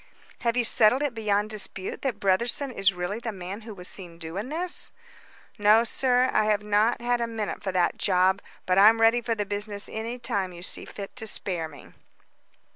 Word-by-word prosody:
"Have 235 0 0
you 245 - +3
settled 230 +4 +4
it 285 -4 -1
beyond 210 -1 0
dispute 195 -2 -4
that 270 -4 -2
Brotherson 235 +8 +1
is 195 -4 +2
really 180 +4 -4
the 235 -1 -4
man 190 +2 -7
who 220 -1 -9
was 180 -1 -7
seen 175 -4 -6
doing 170 +8 -5
this?" 345 +4 -2 0.7
"No, 210 +2 +6
sir. 250 +2 +2
I 215 - +3
have 210 -1 +1
not 210 +3 +2
had 240 0 0
a 235 - 0
minute 220 -4 -4
for 195 - -1
that 180 -1 +1
job, 190 0 +2 0.2
but 185 +1 +3
I'm 220 +3 +7
ready 225 +2 +4
for 235 -1 -1
the 205 -1 -2
business 205 +1 -4
any 225 +3 -5
time 195 -6 -2
you 175 0 -9
see - - -3
fit 200 -1 -8
to 220 -3 -4
spare 175 -5 0
me." 145 -3 -14
210 Hz, 200 wpm, -26 LUFS, 190-235 Hz, 0.7 s, I'm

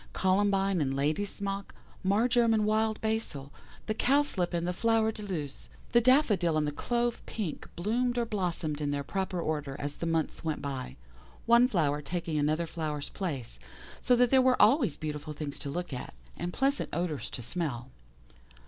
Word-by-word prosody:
Columbine 195 -1 +2
and 135 -2 0
Ladysmock, 195 +7 -2 0.3
Marjoram 230 +4 +3
and 215 -1 +2
Wild 220 0 +1
Basil, 220 -11 -2 0.3
the 215 - 0
Cowslip 250 -7 +2
and 170 -1 -1
the 180 - 0
Flower 225 +2 +2
de 215 - -8
luce, 165 -9 -5 0.2
the 235 - +5
Daffodil 215 - +4
and 155 - +2
the 150 - -1
Clove 240 +9 -1
Pink 200 -8 -4
bloomed 240 +7 0
or 240 - +2
blossomed 170 -8 -2
in 145 - 0
their 145 0 -1
proper 190 +3 -2
order 150 -4 -2
as 145 0 -4
the 170 - -3
months 165 0 -1
went 160 -2 -1
by, 130 - -5 0.5
one 235 +1 +6
flower 150 - +1
taking 165 0 -2
another 155 +3 +1
flower's 155 -3 -4
place, 135 - -4 0.4
so 250 - +4
that 245 0 +3
there 265 -1 +6
were 255 0 +3
always 220 - +4
beautiful 150 0 -5
things 145 -1 -5
to 145 - -5
look 175 +1 -4
at, 125 - -6 0.2
and 175 - -3
pleasant 275 +7 0
odours 170 -4 -2
to 120 - -6
smell. 130 -3 -4
180 Hz, 170 wpm, -30 LUFS, 150-220 Hz, 0.5 s, one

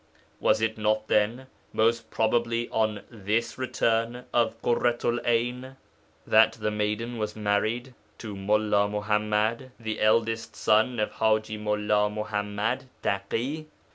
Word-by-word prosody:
Was 110 - +2
it 110 0 -1
not, 110 0 0
then, 115 +5 +2 0.3
most 115 +1 +1
probably 115 +1 +1
on 110 -2 0
this 110 +2 -2
return 120 -1 0
of 115 -1 +1
Ḳurratu'l 120 0 +1
'Ayn 125 +3 -1 0.5
that - - +5
the 105 - -2
maiden 105 +3 -2
was 105 -1 -3
married 110 +4 -1 0.2
to 110 -3 -7
Mullā 105 +1 +2
Muḥammad, 105 +3 0
the 110 -1 -4
eldest 115 +1 +1
son 110 +3 +2
of 105 - 0
Haji 110 -1 0
Mullā 105 0 +1
Muḥammad 105 +4 -2 0.2
Taḳi. 120 +11 -2
110 Hz, 120 wpm, -27 LUFS, 105-120 Hz, 0.5 s, that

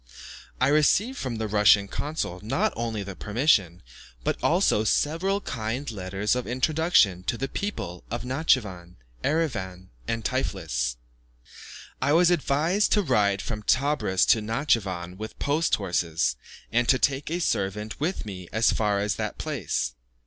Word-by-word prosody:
I 130 - +3
received 185 - +3
from 130 -3 -3
the 110 0 -3
Russian 105 -1 +4
consul 145 - -4
not 155 - 0
only 115 -3 -3
the 100 -1 -7
permission, 105 - +1 0.4
but - - 0
also 105 - +3
several 165 - +1
kind 115 - -4
letters 95 +2 -1
of 125 - -3
introduction 130 - +2
to 125 +2 -1
people 125 - -5
at 120 +2 -4
Natschivan, 110 - 0 0.3
Erivan, 95 - -2 0.2
and 115 -1 -2
Tiflis. 80 - -1 1.1
I 140 - +2
was 175 +2 +5
advised 170 +5 +1
to 210 - +3
ride 105 - +2
from 105 -2 -4
Tebris 130 -6 +2
to 110 - +5
Natschivan 105 - -1
with 110 +2 -7
post 150 +3 +1
horses, 85 -4 0 0.4
and 120 0 +1
to 130 - +6
take 135 +3 0
a 170 +2 -1
servant 105 - -2
with 160 -3 -2
me 90 -4 -8
as 110 +2 +3
far 105 -2 +1
as 100 0 -1
that 105 -1 -3
place. 100 - -2
115 Hz, 140 wpm, -26 LUFS, 100-145 Hz, 1.1 s, to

